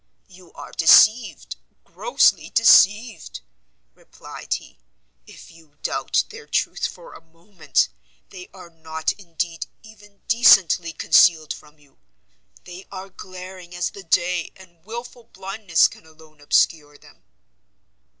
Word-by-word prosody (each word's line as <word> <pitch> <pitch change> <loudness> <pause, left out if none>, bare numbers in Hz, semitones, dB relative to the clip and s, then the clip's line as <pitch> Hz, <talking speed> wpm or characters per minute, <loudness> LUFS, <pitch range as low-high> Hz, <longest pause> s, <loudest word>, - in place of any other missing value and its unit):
"You 180 -1 -18
are - - -11
deceived, 215 +8 +4 0.3
grossly 485 - +1
deceived," 220 - +3 0.5
replied - - -8
he, - - -13 0.5
"if - - -15
you 160 -3 -22
doubt - - -1
their 450 +1 -13
truth - - -2
for - - -14
a - - -14
moment; 165 +3 -2 0.4
they 180 - -12
are 180 -3 -14
not, 160 -1 -4
indeed, 170 -3 -6 0.2
even 205 -2 -19
decently 195 -7 +4
concealed 160 -1 +3
from 150 0 -17
you; 145 -2 -28 0.6
they 180 +2 -12
are 190 +1 -9
glaring 185 -1 -11
as 175 0 -3
the 200 - -12
day, 175 0 -1
and 170 -3 -19
wilful 235 +2 -10
blindness 195 -5 0
can 160 - -17
alone 155 -1 -20
obscure 145 0 0
them." - - -22
180 Hz, 120 wpm, -21 LUFS, 160-205 Hz, 0.6 s, deceived